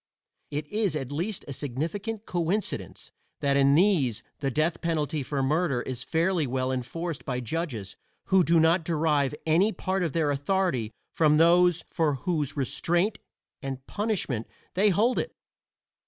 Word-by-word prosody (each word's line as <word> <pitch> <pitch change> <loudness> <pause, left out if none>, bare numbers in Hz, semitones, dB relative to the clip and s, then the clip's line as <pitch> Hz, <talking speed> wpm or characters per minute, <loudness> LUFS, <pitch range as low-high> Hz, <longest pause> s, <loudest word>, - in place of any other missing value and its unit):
It 150 +1 -3
is 210 -5 0
at 135 -3 -4
least 175 +7 -3
a 140 - -4
significant 170 - -4
coincidence 180 +4 -2 0.3
that 140 -1 +1
in 140 0 +5
these 160 - +3 0.2
the 140 - 0
death 155 +5 0
penalty 155 -2 -1
for 135 +1 -2
murder 150 -2 +1
is 125 -1 -5
fairly 165 0 +1
well 130 +1 -1
enforced 155 +6 -4
by 125 -2 -2
judges 120 - -4 0.3
who 190 -1 +4
do 165 0 +4
not 165 +2 +4
derive 150 -4 +1
any 170 +7 +4
part 190 -2 -2
of 165 -5 -1
their 155 -3 +1
authority 145 - 0 0.2
from 150 -2 +4
those 175 +1 +5
for 155 -4 +1
whose 155 0 -2
restraint 175 - 0 0.4
and 135 -1 -5
punishment 200 - -2 0.3
they 205 +3 +4
hold 225 +6 +2
it. - - -4
160 Hz, 150 wpm, -27 LUFS, 140-180 Hz, 0.4 s, in